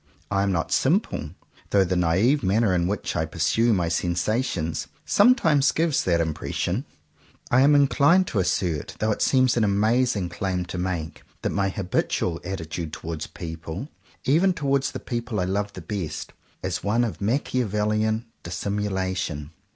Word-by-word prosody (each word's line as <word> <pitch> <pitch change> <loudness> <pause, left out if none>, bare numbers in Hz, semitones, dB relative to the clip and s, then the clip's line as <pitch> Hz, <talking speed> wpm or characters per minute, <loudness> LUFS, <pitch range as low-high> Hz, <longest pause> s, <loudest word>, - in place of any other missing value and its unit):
I 100 -1 +2
am 100 0 +1
not 85 -3 -1
simple; - - +1 0.4
though 100 -1 +4
the 95 0 -1
naive 95 - +3
manner 100 +1 +2
in 85 -1 +1
which 105 +2 -2
I 80 - 0
pursue 85 +9 +2
my 90 -5 +1
sensa 90 +8 0
tions, 80 -10 -3 0.2
sometimes 170 - +4
gives 160 -2 +1
that 85 -2 +2
impression. 85 - -2 0.7
I 125 - +5
am 145 +2 +6
inclined 145 +6 +4
to 105 - 0
assert, 85 -4 -1
though 110 0 +1
it - - -2
seems 130 -2 +3
an 115 - +3
amazing 105 -1 +2
claim 90 0 -2
to 90 +1 -5
make, 90 -3 -3 0.2
that - - 0
my 100 -1 +1
habitual 90 -3 -1
attitude 80 -3 -5
towards 80 -1 -5
people, 80 - -7 0.3
even 175 +7 +3
towards 140 -3 0
the - - -5
people 120 -3 -3
I - - +1
love 100 +2 -1
the 90 - -8
best, 80 -2 -5 0.3
is - - -2
one 110 +4 +2
of 115 -3 -3
Machiavel 105 -2 0
lian 110 +1 +1 0.2
dissimulation. 95 -5 -3
100 Hz, 160 wpm, -25 LUFS, 85-120 Hz, 0.7 s, am